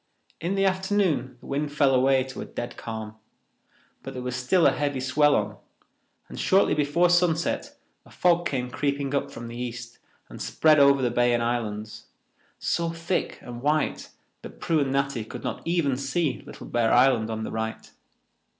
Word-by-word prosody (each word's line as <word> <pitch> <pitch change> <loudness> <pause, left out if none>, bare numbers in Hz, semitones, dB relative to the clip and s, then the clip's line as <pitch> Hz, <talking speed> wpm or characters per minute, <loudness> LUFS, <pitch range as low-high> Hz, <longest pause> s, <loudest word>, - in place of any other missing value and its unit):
In 175 +4 -2
the 195 0 +2
afternoon 190 -9 0
the - - -15
wind 145 +1 -2
fell 145 -2 +3
away 130 +1 +4
to 130 0 -8
a - - -5
dead 120 0 -6
calm, 110 -1 -7 0.8
but - - -8
there 125 - -5
was 125 0 -3
still 130 +8 +2
a - - +6
heavy 145 -2 -1
swell 140 +3 +3
on, 105 0 -1 0.7
and - - -9
shortly 190 +1 +3
before 150 +4 +2
sunset 175 -2 +1 0.3
a - - -19
fog 175 -1 +2
came 125 -2 -3
creeping 140 -1 -1
up 140 - 0
from 115 - -8
the 115 - -8
east 120 -1 -6 0.3
and - - -10
spread 155 -2 +3
over 140 -1 +5
the 120 - +1
bay 120 0 +3
and 120 - 0
islands, 110 -3 -3 0.5
so 170 -1 -1
thick 165 +2 -2
and 120 -1 -8
white 150 +2 0 0.3
that - - -11
Prue 160 -2 +1
and 140 -2 0
Natty 140 -4 0
could 110 - -9
not - - -4
even 165 -6 +1
see 140 +1 -1
Little - - -10
Bear 120 -1 +1
Island 120 -3 +4
on 110 0 -3
the - - -5
right. 110 0 -4
135 Hz, 180 wpm, -26 LUFS, 120-155 Hz, 0.8 s, a